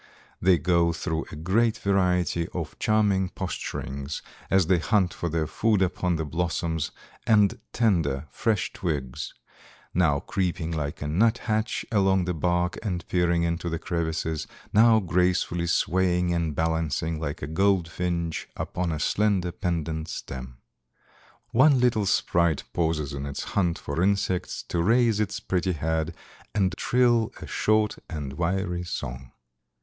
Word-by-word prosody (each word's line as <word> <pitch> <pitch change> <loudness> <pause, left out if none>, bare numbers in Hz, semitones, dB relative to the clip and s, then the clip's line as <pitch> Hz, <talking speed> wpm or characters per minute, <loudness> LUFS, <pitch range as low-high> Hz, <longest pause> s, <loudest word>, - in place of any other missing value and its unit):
They 90 -1 +5
go 85 +2 +2
through 80 0 -2
a - - -7
great 105 +9 +1
variety 90 -3 +1
of - - -5
charming 100 -4 +2
posturings 70 -6 -5 0.3
as 95 -2 +4
they 90 +1 +3
hunt 90 +3 +2
for 85 - -3
their 80 0 0
food 105 +5 +2
upon 90 -1 0
the 80 -1 -2
blossoms 80 0 -1 0.4
and 110 +1 +4
tender, 80 - +1
fresh 110 -4 0
twigs, 70 -8 -3 0.6
now 80 -5 +3
creeping 90 -2 -2
like 75 -3 -3
a - - -3
nuthatch 110 +5 +1
along 95 -3 +3
the 90 - -1
bark 90 +2 0
and 90 -5 -3
peering 85 -1 +2
into 85 +1 -1
the 85 - -2
crevices, 80 -2 -2 0.3
now 110 +1 +6
gracefully 90 -2 +1
swaying 90 0 +2
and 80 -3 -1
balancing 80 0 0
like 75 -3 -4
a - - -2
goldfinch 85 -1 0
upon 90 -1 -2
a 80 - -2
slender, 95 0 +1
pendant 80 -3 -2
stem. 65 -5 -7 0.9
One 135 +2 +5
little 115 -5 +2
sprite 85 -5 +2
pauses 80 -4 0
in 70 0 -4
its 70 - -4
hunt 85 -4 +1
for 70 +4 -3
insects 95 -1 0
to 85 - 0
raise 115 +2 +3
its 105 -1 -1
pretty 90 0 0
head 80 +1 -1 0.4
and 95 -3 +2
trill 120 -1 +2
a - - -7
short 110 0 +1
and 75 -5 -5
wiry 90 +2 -1
song." 65 -7 -6
85 Hz, 140 wpm, -26 LUFS, 80-95 Hz, 0.9 s, now